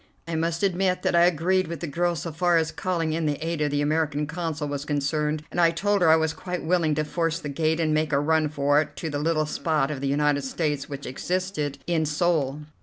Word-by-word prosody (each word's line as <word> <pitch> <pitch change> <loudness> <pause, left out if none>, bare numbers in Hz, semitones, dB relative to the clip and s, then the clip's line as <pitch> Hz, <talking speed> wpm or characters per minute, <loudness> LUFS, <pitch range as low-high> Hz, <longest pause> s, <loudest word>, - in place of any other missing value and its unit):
I 165 - -4
must 165 +2 -1
admit 185 -1 +1
that - - +1
I 170 0 +6
agreed 180 +2 +2
with 170 -2 -5
the 170 - -4
girl 170 +3 0
so 165 +1 -4
far 175 +2 +2
as 160 -1 +1
calling 165 0 -1
in 160 -1 -1
the 145 - +1
aid 165 -2 -2
of 150 - +2
the 145 0 0
American 150 -1 0
Consul 160 -1 -3
was 145 -1 -3
concerned, 150 +1 -1
and 175 - 0
I 170 - +6
told 200 +4 0
her 170 - +5
I 160 - +8
was 160 -1 +1
quite 180 +2 -5
willing 160 -2 +2
to 155 - 0
force 165 +1 -1
the 150 -3 -6
gate 160 +3 0
and 155 -2 +1
make 155 0 +1
a 140 - +3
run 155 +1 +2
for 145 0 +2
it 145 -1 -7
to 160 0 -4
the 145 - -2
little 155 0 +1
spot 150 -2 0
of 140 -3 -5
the 140 - -1
United 145 0 +1
States 145 +1 -2
which 140 -1 -6
existed 155 0 -2
in 160 -3 0
Seoul. 150 -3 0
160 Hz, 245 wpm, -25 LUFS, 145-170 Hz, -, I